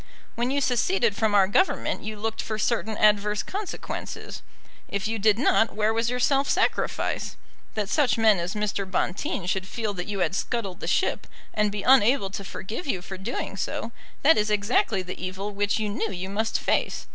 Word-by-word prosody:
When 240 +1 -1
you 280 +1 +1
seceded 245 - +2
from 215 -1 +1
our 195 -2 +6
Government 375 - +1
you 215 0 -5
looked 225 +1 -2
for 215 - -4
certain 220 -1 0
adverse 210 0 +3
consequences. 405 0 -6 0.5
If 200 0 -2
you 225 0 -2
did 210 0 +4
not, 230 -3 +3
where 215 +1 +2
was 230 +1 +1
your 250 0 -1
self 275 +2 +2
sacrifice? - - 0 0.4
That 210 -2 -1
such 270 +2 +2
men 220 -4 +5
as 175 +4 -3
Mr. 205 -2 -2
Bonteen 185 - -1
should 185 +1 -1
feel 220 -1 -3
that 180 -2 -5
you 200 -2 -3
had 175 -1 +1
scuttled 195 -2 -2
the - - -5
ship, 275 - +1 0.3
and 210 -1 +1
be 205 -1 -4
unable 250 -5 +5
to 200 - -5
forgive 215 - -6
you 185 -9 -1
for 190 - -7
doing 205 0 -4
so, 225 +3 -3 0.3
that 310 -4 +6
is 210 0 +1
exactly 205 -1 +1
the 185 0 -7
evil 190 +3 -4
which 205 0 0
you 215 -1 -1
knew 210 +1 -2
you 190 0 -5
must 220 +2 0
face. - - 0
210 Hz, 190 wpm, -26 LUFS, 195-230 Hz, 0.5 s, our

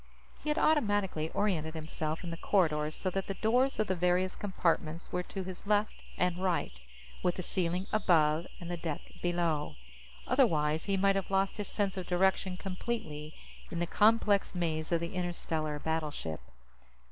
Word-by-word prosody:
He 305 - -2
had 300 - +1
automatically 205 - +2
oriented 165 -6 0
himself 155 0 -3
in 170 - -4
the 165 - -5
corridors 155 -6 +2
so 185 - -1
that 195 +1 -2
the 195 - -3
doors 250 +6 +2
of 215 - +2
the 190 - 0
various 180 +1 +1
compartments 170 -4 -1
were 180 - 0
to 190 +1 -5
his 185 +1 -8
left 210 0 +2 0.2
and 180 0 +1
right, 165 - -1 0.4
with 180 - +1
the 185 - -4
ceiling 180 +1 0
"above" 165 -5 +3
and 175 0 -6
the 175 - -2
deck 160 -3 -3 0.2
"below." 170 - 0 0.5
Otherwise, 160 - +2
he 195 -1 +1
might 195 +1 +3
have 195 -1 -1
lost 195 +1 +1
his 210 - -3
sense 200 -2 -1
of 185 - -4
direction 190 0 +2
completely 180 -6 -4 0.3
in 170 - -5
the 175 - +1
complex 210 0 +3
maze 160 -2 -1
of 170 -1 +2
the 170 +2 -4
interstellar 165 -4 -2
battleship. 150 - -3
180 Hz, 170 wpm, -32 LUFS, 160-195 Hz, 0.5 s, above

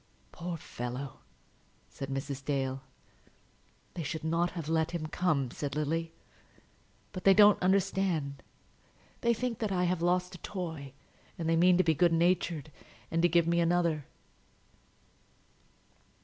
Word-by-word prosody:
"Poor 175 0 -5
fellow!" 125 -1 -6 0.7
said 135 - -7
Mrs. 135 0 -4
Dale. 135 -1 -1 1.1
"They 175 - -5
should 160 +1 -4
not 165 +2 +1
have 165 -4 -5
let 160 0 +1
him 170 -2 -3
come," 155 -6 0
said 145 -1 -4
Lily. 165 +2 -1 1.0
"But 185 - -7
they 195 -1 +6
don't 205 0 +7
understand. 180 -6 +1 0.8
They 235 0 +3
think 240 0 -3
that 215 -3 -1
I 180 -1 +1
have 180 -1 0
lost 180 +1 +1
a 180 - -10
toy, 160 -9 -6 0.4
and 165 -3 -3
they 165 - +3
mean 175 +2 +5
to 185 - +4
be 160 - +3
good 170 +2 +3
natured, 170 -3 +1 0.4
and 165 - +1
to 175 - +4
give 170 0 +4
me 170 +1 +2
another." 170 -3 +1
165 Hz, 140 wpm, -30 LUFS, 150-180 Hz, 1.1 s, don't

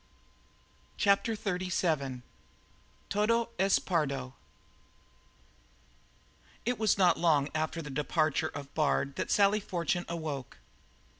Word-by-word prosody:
CHAPTER 205 +3 +2
XXXVII 175 - -1 0.9
"TODO 230 +3 +1
ES 195 +1 +4
PERDO" 140 -7 -1 2.3
It 245 0 -1
was 215 -2 +3
not 180 -4 +4
long 150 -4 +3
after 155 +1 -2
the 150 - -7
departure 150 +2 0
of 140 -1 -9
Bard 140 -2 +1
that - - -2
Sally 205 +1 +4
Fortune 175 -2 -2
awoke. 155 -6 -5
170 Hz, 95 wpm, -30 LUFS, 145-200 Hz, 2.3 s, ES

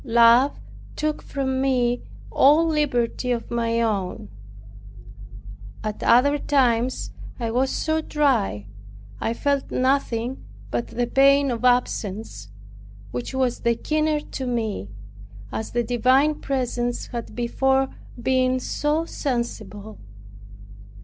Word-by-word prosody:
Love 235 +2 +5 0.4
took 305 0 -2
from 265 -2 -2
me 245 -2 +1 0.3
all 300 +4 +5
liberty 265 -6 0
of 235 -1 -3
my 230 -1 0
own. 200 - -2 1.5
At 215 -1 -4
other 285 +5 +4
times 255 -3 +1 0.3
I 230 -2 -2
was 260 +3 +1
so 315 +3 0
dry, 250 - 0 0.5
I 230 - -1
felt 280 0 0
nothing 255 -2 0 0.3
but 120 -1 -1
the 245 - -1
pain 275 +2 +4
of 235 0 -4
absence, 215 - 0 0.6
which 125 - -5
was 255 -2 0
the 235 0 +1
keener 305 +3 0
to 265 -3 -6
me, 220 - -2 0.6
as 220 - -4
the 240 0 0
divine 255 +6 +2
presence 245 -3 -2
had 235 -2 -6
before 265 +3 +1 0.3
been 255 +1 +2
so 300 +5 -1
sensible. 220 -7 -4
250 Hz, 110 wpm, -23 LUFS, 230-275 Hz, 1.5 s, Love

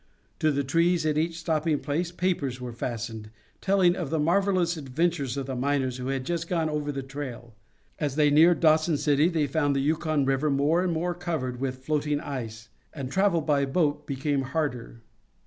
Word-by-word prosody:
To 155 - +3
the 140 -1 0
trees 165 +4 +2
at 155 -1 +1
each 165 +2 0
stopping 160 -1 0
place 160 +5 -2
papers 170 -8 -1
were 125 -1 -6
fastened, 115 -2 -5 0.3
telling 190 -3 +3
of 170 -7 -4
the 160 - 0
marvelous 175 +2 +2
adventures 145 -1 -1
of 135 - -2
the 135 0 -4
miners 130 -1 0
who 125 0 -5
had 135 -1 -2
just 170 +1 -2
gone 165 -3 0
over 150 -1 -2
the 135 -1 -4
trail. 130 -4 -7 0.5
As 145 -3 -1
they 150 -1 +4
neared 165 +3 +5
Dawson 155 -1 +4
City 145 +3 +3
they 160 -4 +1
found 145 0 0
the - - +1
Yukon 155 0 +1
River 135 +3 +1
more 145 +5 +2
and 180 - 0
more 170 +2 -1
covered 155 -8 -3
with 130 -1 -4
floating 150 -1 0
ice, 115 -6 -6 0.2
and 135 -4 -6
travel 190 -2 +2
by 145 -2 +1
boat 145 +1 0
became 140 0 -1
harder. 130 -4 -3
150 Hz, 185 wpm, -27 LUFS, 135-165 Hz, 0.5 s, neared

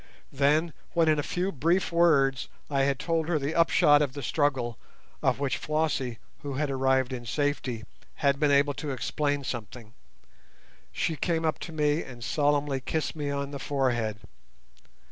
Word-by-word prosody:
Then 150 +4 +2 0.2
when 165 -2 +3
in 155 -1 +3
a - - +2
few 180 +6 -2
brief 170 +6 +1
words 140 -6 +3 0.2
I 140 -1 +2
had 140 -1 +1
told 165 0 -1
her 170 -2 +1
the 145 +2 -2
upshot 150 -3 +5
of 140 -3 0
the 140 -1 -6
struggle 125 -2 0 0.4
(of - - +2
which 135 -3 0
Flossie, 150 -6 -1 0.2
who 140 -1 -5
had 145 0 -1
arrived 130 -1 +1
in 120 -1 -5
safety, 130 -1 -2 0.3
had 140 -1 +1
been 150 - +3
able 140 +1 +4
to 150 +1 -5
explain 145 +2 -1
something) 115 -2 -6 1.0
she 160 - -1
came 165 +1 -1
up 155 -2 0
to 170 - -7
me 150 0 +1
and 120 -2 -9
solemnly 145 0 +1
kissed 155 +2 -2
me 145 -2 -3
on 140 0 -3
the 140 - -5
forehead. 120 -7 -1
145 Hz, 165 wpm, -28 LUFS, 130-155 Hz, 1.0 s, upshot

